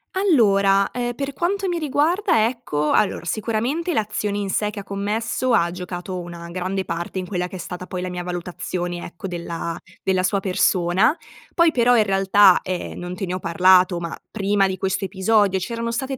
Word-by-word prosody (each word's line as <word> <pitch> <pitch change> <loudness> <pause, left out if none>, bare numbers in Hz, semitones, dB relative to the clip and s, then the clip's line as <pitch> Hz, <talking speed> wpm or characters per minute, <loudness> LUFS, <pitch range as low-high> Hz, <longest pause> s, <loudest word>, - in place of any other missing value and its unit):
Allora, 200 - +3
ehm, 240 0 -3
per 275 +2 -3
quanto 380 +6 -1
mi 345 -1 -1
riguarda, 300 - +2
ecco 150 -12 -2
allora 205 - +1
sicuramente 235 - -1
l'azione 210 -3 -1
in 200 -1 -3
sé 210 +2 0
che 210 -1 -6
ha - - -12
commesso 215 +5 -1
ha 170 -6 +3
giocato 180 +1 -5
una 170 -1 -8
grande 185 +2 -2
parte 170 +1 -5
in 185 - -2
quella 180 -1 -2
che 185 - -10
è - - -6
stata 180 +1 -7
poi 180 - -4
la 185 - -3
mia 180 0 -4
valutazione, 175 0 -4
ecco, 175 +3 -8
della 170 -1 -4 0.3
della 185 -1 +1
sua 195 +1 +1
persona. 185 - +2 0.4
Poi 335 -1 +5
però 245 -2 +4
in 220 - +5
realtà, 195 -1 +5
ehm, 185 -1 -5
non 180 0 -5
te 195 - -3
ne 180 0 -3
ho - - -3
parlato, 180 +1 +4
ma 170 -1 -4 0.2
prima 200 -2 +1
di 190 - -2
questo 190 +1 -1
episodio 195 0 +2
c'erano 230 +4 -3
state 265 +3 -3
195 Hz, 190 wpm, -22 LUFS, 180-230 Hz, 0.4 s, Poi